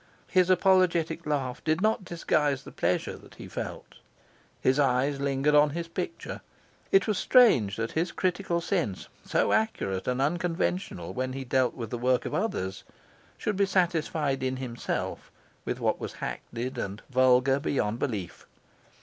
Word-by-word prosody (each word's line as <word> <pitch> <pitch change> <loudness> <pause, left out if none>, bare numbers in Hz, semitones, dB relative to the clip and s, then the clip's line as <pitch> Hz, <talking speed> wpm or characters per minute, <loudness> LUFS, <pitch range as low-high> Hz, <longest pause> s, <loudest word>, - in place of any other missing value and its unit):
His 185 -1 +3
apologetic 175 -4 +3
laugh 135 -4 -2
did 155 +1 +1
not 215 0 +1
disguise 150 -6 0
the - - -10
pleasure 90 +1 -1
that - - -16
he - - -9
felt. - - -7 0.6
His 130 +2 +2
eyes 135 +1 +2
lingered 140 +1 +1
on 150 0 +6
his 170 -1 -3
picture. 335 - -5 0.5
It 390 - +5
was 215 -3 0
strange 130 - +5
that 115 +1 -3
his 170 +2 -1
critical 180 -2 -1
sense, 165 - -2
so - - +1
accurate 100 - 0
and 125 0 0
unconventional 165 - -1
when 130 +4 -2
he 135 0 -4
dealt 130 0 +1
with 115 -4 -6
the 120 - -3
work 125 +1 +2
of - - -4
others, 95 - -2 0.5
should 210 -2 -2
be 200 0 +3
satisfied 165 -6 0
in 130 0 -1
himself 125 -2 -4 0.4
with - - -3
what - - 0
was - - -5
hackneyed 125 +2 -5
and 100 0 -5
vulgar 130 +1 +4
beyond 115 -5 -1
belief. 105 -10 -4
140 Hz, 155 wpm, -28 LUFS, 125-175 Hz, 0.6 s, on